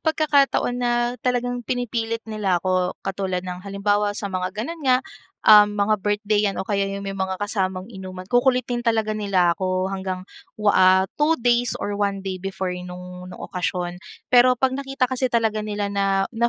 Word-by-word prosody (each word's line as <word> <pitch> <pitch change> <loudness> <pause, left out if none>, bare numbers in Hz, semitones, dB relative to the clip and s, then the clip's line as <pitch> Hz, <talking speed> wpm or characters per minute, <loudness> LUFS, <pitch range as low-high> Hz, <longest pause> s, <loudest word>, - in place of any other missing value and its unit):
pagkakataon 290 -5 +2
na 240 -1 +1 0.3
talagang 245 -1 -1
pinipilit 230 -2 -2
nila 210 -5 0
ako 185 0 0
katulad 190 -2 -2
ng 180 0 -6
halimbawa 205 +1 0
sa 205 - -4
mga 185 0 -1
ganun 320 +10 -4
nga, 260 -2 +2 0.4
uhm, 210 -1 +7
mga 205 +1 +3
birthday 205 0 +1
'yan 195 - -4
o - - -2
kaya 200 -1 0
yung 200 0 -5
may 195 - -3
mga 190 -1 -2
kasamang 190 -3 -2
inuman. 185 -2 -8
Kukulitin 245 +1 +2
talaga 220 -2 +1
nila 195 -5 +2
ako 185 +1 -1
hanggang 190 -1 -4 0.3
wa 210 -1 +3
ah, 185 0 +6 0.2
2 320 +2 +4
days 240 0 +2
or 205 - -3
1 200 -1 -1
day 185 -1 -3
before 190 -1 -3
nung, 180 0 -8
nung - - -10
okasyon. 180 -1 -3 0.3
Pero 250 +1 +6
'pag 260 -1 +2
nakita 270 -1 -1
kasi 260 0 -1
talaga 220 -2 +1
nila 205 -1 -2
na, 195 -1 +1
na 235 +1 +2
205 Hz, 175 wpm, -23 LUFS, 190-240 Hz, 0.4 s, uhm